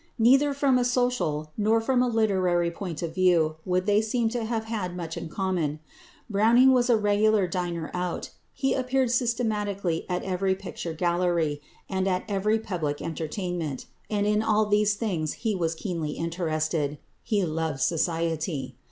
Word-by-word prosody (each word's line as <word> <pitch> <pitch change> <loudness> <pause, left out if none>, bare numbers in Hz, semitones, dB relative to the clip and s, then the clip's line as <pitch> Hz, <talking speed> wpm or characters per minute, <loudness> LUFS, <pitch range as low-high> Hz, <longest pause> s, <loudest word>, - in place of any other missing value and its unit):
Neither 270 +5 +5
from 275 -2 +3
a - - +2
social 245 -12 0
nor 220 +2 +3
from 250 +2 +1
a 250 - +3
literary 185 -7 +2
point 170 -2 -5
of 165 -1 -3
view 165 -4 +3
would 185 0 0
they 205 0 +4
seem 225 +1 0
to 235 -1 -2
have 225 -1 -2
had 205 -6 -4
much 165 -2 -5
in 165 - -6
common. 170 -5 -1 0.5
Browning 235 +5 +5
was 250 -1 +2
a 235 - +5
regular 210 -1 +3
diner 175 -2 -3
out, 180 -1 -3 0.2
he 270 - 0
appeared 260 -1 +1
systematically 210 -8 -1
at 180 0 -1
every 190 0 0
picture 185 -3 -6
gallery, 170 -3 0 0.3
and 190 0 -1
at 185 -1 0
every 210 +2 +1
public 170 -9 -3
entertainment, 165 -2 -4 0.2
and 205 -1 0
in 210 +1 +2
all 215 -1 +2
these 210 0 +2
things 175 -9 -2
he 225 -2 -2
was 165 -3 -1
keenly 160 -4 -3
interested: 155 -3 -1 0.2
he 205 -4 0
loved 160 -3 -2
society. 165 0 -1
190 Hz, 160 wpm, -26 LUFS, 165-220 Hz, 0.5 s, Neither